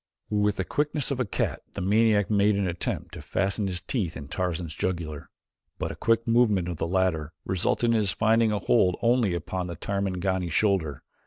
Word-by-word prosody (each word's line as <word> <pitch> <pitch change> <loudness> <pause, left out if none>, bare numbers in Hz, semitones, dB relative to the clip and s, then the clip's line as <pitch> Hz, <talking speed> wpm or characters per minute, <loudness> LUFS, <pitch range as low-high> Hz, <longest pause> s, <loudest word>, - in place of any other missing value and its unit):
With 105 -1 +2
the 95 - -1
quickness 145 - 0
of 135 - -2
a 125 - +1
cat 100 - -2
the - - -5
maniac 105 +1 +3
made 105 0 +3
an 100 -1 0
attempt 85 0 -3
to - - -7
fasten 100 +1 -1
his 90 -2 -2
teeth 95 -9 -2
in 70 - -9
Tarzan's 85 -3 -2
jugular, 80 -3 -3 0.5
but - - -3
a - - -7
quick 115 0 +1
movement 110 -6 +3
of 85 -2 -4
the 80 - -2
latter 85 -4 0
resulted 95 +5 +1
in - - +3
his 105 -3 +2
finding 110 +3 +3
a 105 - 0
hold 95 -4 +2
only 115 -6 +3
upon 90 +2 -3
the 85 - -5
Tarmangani's 95 -2 -2
shoulder. 95 -7 +1
95 Hz, 190 wpm, -26 LUFS, 90-110 Hz, 0.5 s, maniac